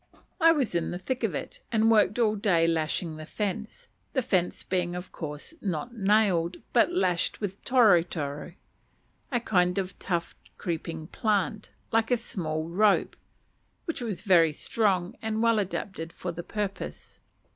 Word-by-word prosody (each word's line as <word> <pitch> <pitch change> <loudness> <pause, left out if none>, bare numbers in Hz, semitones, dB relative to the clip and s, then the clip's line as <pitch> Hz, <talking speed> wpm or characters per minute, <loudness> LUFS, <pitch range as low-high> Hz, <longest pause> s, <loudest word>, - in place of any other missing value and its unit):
I 330 -1 +7
was 280 - +1
in 170 -1 0
the 175 - -3
thick 245 +8 -3
of - - 0
it, - - -6
and 225 0 +4
worked 210 -1 +4
all 220 -3 +3
day 190 -6 +3
lashing 160 0 0
the 155 - -7
fence; 220 - -4 0.3
the 260 - +1
fence 180 -5 0
being 180 -1 -1
of 180 +1 -7
course 150 - -6
not 195 +5 -3
nailed, 195 -5 +2 0.2
but 245 +8 +4
lashed 180 - +1
with 200 -2 -5
toro 225 -9 +6
toro, 150 -2 -5 0.8
a 245 - +2
kind 180 -5 +2
of 190 -1 -3
tough 170 -3 -2 0.2
creeping 165 -2 -4
plant, 210 +3 -1 0.2
like 225 0 +2
a 245 - +3
small 160 -8 -3
rope, 200 +4 +3 0.7
which 330 -7 -3
was 220 -6 -4
very 170 -6 +5
strong 185 +2 0
and 220 0 -1
well 230 -2 +4
adapted 190 -4 -4
for 180 - -5
the 170 +1 -6
purpose. 205 +1 -5
195 Hz, 155 wpm, -28 LUFS, 170-220 Hz, 0.8 s, I